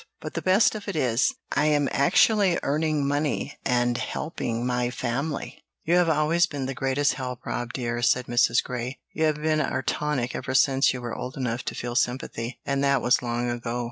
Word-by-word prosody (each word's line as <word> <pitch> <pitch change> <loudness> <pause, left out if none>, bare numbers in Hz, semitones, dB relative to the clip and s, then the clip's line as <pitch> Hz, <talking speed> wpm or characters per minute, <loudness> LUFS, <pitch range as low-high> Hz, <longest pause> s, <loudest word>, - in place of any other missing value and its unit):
But - - -7
the - - -3
best 190 +4 +4
of 210 -2 -7
it 200 - -3
is, 130 - +1 0.2
I 150 - +2
am 145 -2 +3
actually 190 +6 +4
earning 150 0 0
money 145 0 -1
and 120 -1 +1
helping 125 -3 -3
my 125 -1 0
family." 130 +5 -4 0.2
"You 170 - 0
have 175 -2 +3
always 160 +3 +3
been 145 -5 -4
the 135 - -3
greatest 135 +2 +1
help, 125 -3 -6
Rob 120 0 -3
dear," 120 -2 -3
said 125 0 +2
Mrs. 120 0 +3
Grey. 125 +1 -4 0.2
"You 160 - +1
have 155 -1 +1
been 155 0 +1
our 130 -2 -1
tonic 135 -5 -1
ever 130 - -4
since 135 +1 +4
you 125 - -5
were 120 - -4
old 125 +3 -6
enough 125 -2 -2
to - - -3
feel 120 0 -4
sympathy, 125 -1 -2
and 140 0 0
that 140 -2 +2
was 125 - +3
long 120 0 -2
ago." 120 0 -3
135 Hz, 200 wpm, -25 LUFS, 120-150 Hz, 0.2 s, best